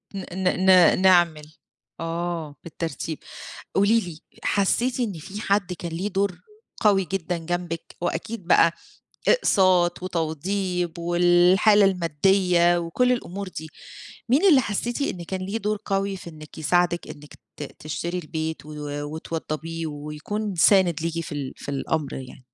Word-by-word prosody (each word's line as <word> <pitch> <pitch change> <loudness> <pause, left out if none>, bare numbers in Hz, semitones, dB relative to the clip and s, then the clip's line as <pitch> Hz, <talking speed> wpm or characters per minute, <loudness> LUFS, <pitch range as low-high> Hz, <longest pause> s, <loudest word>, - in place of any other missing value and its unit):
ن 190 - -4
ن 185 0 0
ن 185 -1 +6
نعمل 170 -5 +4 0.5
آه، 165 -2 -3
بالترتيب. 165 -1 -5 0.6
قولي 210 +4 +4
لي، 170 -5 -8 0.3
حسّيتِ 235 +6 +1
إن 225 -5 0
في 200 +6 -8
حد 195 -3 0
كان 170 -1 -6
له 195 +4 -2
دور 195 -2 -1 0.4
قوي 200 -3 +4
جدًا 175 -2 -2
جنبِك 175 0 -4
وأكيد 175 +3 -4
بقى 170 -2 +5 0.6
إقساط 185 - +3
وتوضيب 180 +1 -2
والحالة 175 +4 +4
الماديّة 175 0 +3
وكلّ 175 +10 +1
الأمور 200 -5 -3
دي، 160 -3 -8 0.6
مين 285 +10 +4
اللي 275 -5 +6
حسّيتِ 235 +5 -2
إن 180 -10 -2
كان 185 +2 -4
ليه 200 +4 -3
دور 210 -1 -1
قوي 195 -1 -1
في 170 - -10
إنِك 155 -1 -13
يساعدِك، 175 +2 +1
إنِك 145 0 -11 0.2
ت 150 - -5 0.2
تشتري 170 +4 -4
البيت 160 -1 -4
و 155 - -10 0.4
وتوضّبيه 160 0 -4
ويكون 155 +8 -5
سانِد 175 -2 +4
ليكِ 165 0 -2
في - - -9
ال 140 -3 -4
في - - -9
الأمر 140 +1 -2
يعني؟ 130 -1 -9
175 Hz, 140 wpm, -24 LUFS, 165-195 Hz, 0.6 s, ن